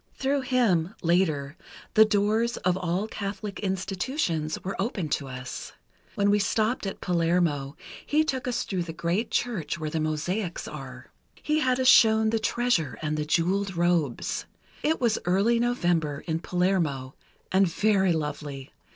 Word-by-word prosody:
Through 275 +1 0
him, 225 -9 +1
later, 160 -5 +1 0.4
the 220 - +7
doors 215 +3 +1
of 180 -1 +1
all 185 +3 -1
Catholic 200 -1 -5
Institutions 190 - -2
were 195 - -3
opened 195 -7 -2
to 140 - -1
us. 130 -1 -7 0.4
When 200 0 +3
we 205 - +3
stopped 215 +2 0
at 195 - -6
Palermo, 165 -5 0 0.3
he 305 +1 +2
took 265 -5 -2
us 245 - 0
through 185 -3 -2
the 170 -1 -5
great 170 +7 -1
church 180 -11 -1
where 155 -2 -4
the 160 - -1
mosaics 170 +5 -2
are. - - -9 0.3
He 305 +1 +1
had 255 -3 +1
us 260 - +2
shown 220 -3 +6
the 225 - +1
treasure, 220 - 0
and 155 0 -1
the 150 0 -2
jeweled 185 +5 +1
robes. 170 -6 0 0.4
It 320 +1 +1
was 235 -3 +2
early 200 +7 +3
November 175 - 0
in 160 -1 -1
Palermo, 165 -8 0 0.4
and 190 0 +4
very 190 +1 +2
lovely. 150 -3 -4
185 Hz, 150 wpm, -26 LUFS, 160-220 Hz, 0.4 s, the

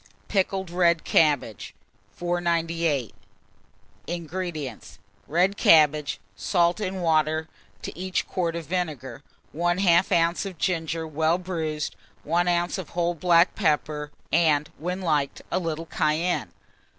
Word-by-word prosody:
PICKLED 190 -2 0
RED 170 -2 +3
CABBAGE. 145 - +1 0.4
498. 170 - -1 0.9
INGREDIENTS. 165 -6 -5 0.3
Red 180 +5 +2
cabbages, 150 -2 +4 0.2
salt 170 - +1
and 190 -3 -3
water; 155 -1 +2 0.4
to - - -6
each 185 +1 -2
quart 170 -3 -1
of 170 -1 -5
vinegar, 145 -7 -3 0.3
1/2 175 0 +3
oz. 175 - -4
of 185 -3 -8
ginger 165 -2 -1
well 160 +2 +1
bruised, 160 -5 -3 0.3
1 175 +3 +1
oz. 175 +2 +1
of 180 - -7
whole 175 0 +1
black 170 +1 +4
pepper, 150 -1 0 0.2
and, 150 -3 +3
when 180 +4 -3
liked, 150 -6 0
a - - +1
little 165 -2 -3
cayenne. 160 +3 0
170 Hz, 115 wpm, -25 LUFS, 155-175 Hz, 0.9 s, cabbages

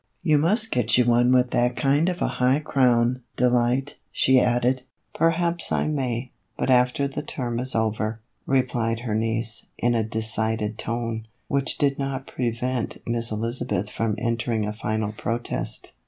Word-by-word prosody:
You 150 -2 +4
must 215 +9 +2
get 120 -1 +3
you 125 - +4
one 120 +1 +4
with 125 -1 +3
that 120 0 +2
kind 145 +4 +2
of 180 -1 -2
a - - +2
high 130 +2 +4
crown, 125 -4 +2
Delight," 125 +3 +1
she 130 0 +4
added. 125 +1 +2 0.2
" - - -47
Perhaps 170 +1 +1
I - - +1
may, 125 -4 -2 0.3
after 125 +2 +2
the 135 - -4
term 120 -5 -3
is 130 +1 -1
over," 110 0 -1 0.3
replied 120 -4 0
her 120 -3 -3
niece, 115 0 -1
in 120 0 +1
a 115 -1 +1
decided 110 0 -2
tone, 115 -1 -3 0.2
which 140 -1 0
did 140 -1 +1
not 135 -1 -3
prevent 125 0 -2
Miss 115 0 -1
Elizabeth 110 -2 -2
from 115 -2 -1
entering 115 -1 -1
a 105 - -3
final 110 -1 -2
protest. 115 +2 -3
120 Hz, 155 wpm, -24 LUFS, 115-130 Hz, 0.3 s, You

